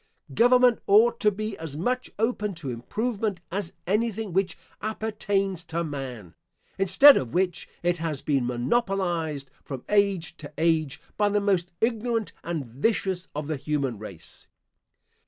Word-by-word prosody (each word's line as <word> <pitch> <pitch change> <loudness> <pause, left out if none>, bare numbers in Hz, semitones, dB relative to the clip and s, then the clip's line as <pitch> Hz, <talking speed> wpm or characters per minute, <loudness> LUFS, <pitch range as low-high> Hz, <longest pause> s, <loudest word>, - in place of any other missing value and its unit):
Government 245 0 +5
ought 230 +4 +5
to 210 - +4
be 215 +1 -4
as 160 -3 -6
much 250 +9 -1
open 210 -3 0
to 145 -6 -5
improvement 205 - -2
as 190 -1 -2
anything 215 0 -1
which 190 +1 +1 0.2
appertains 205 -4 -1
to 165 +1 -2
man, 130 - -6 0.5
instead 195 +10 +8
of 125 -3 -3
which 180 -2 0
it 175 0 +2
has 160 -4 -3
been 135 -5 +1
monopolised 165 - -1
from 135 -3 -7
age 200 -5 +2
to 145 -1 -9
age, 160 -3 +1 0.2
by 205 -1 +3
the 205 0 +2
most 190 -4 +1
ignorant 230 -1 0
and 165 -4 -3
vicious 180 - -1
of 150 0 -3
the 155 0 -2
human 135 -5 -2
race. 100 -6 -10
185 Hz, 140 wpm, -26 LUFS, 150-215 Hz, 0.5 s, instead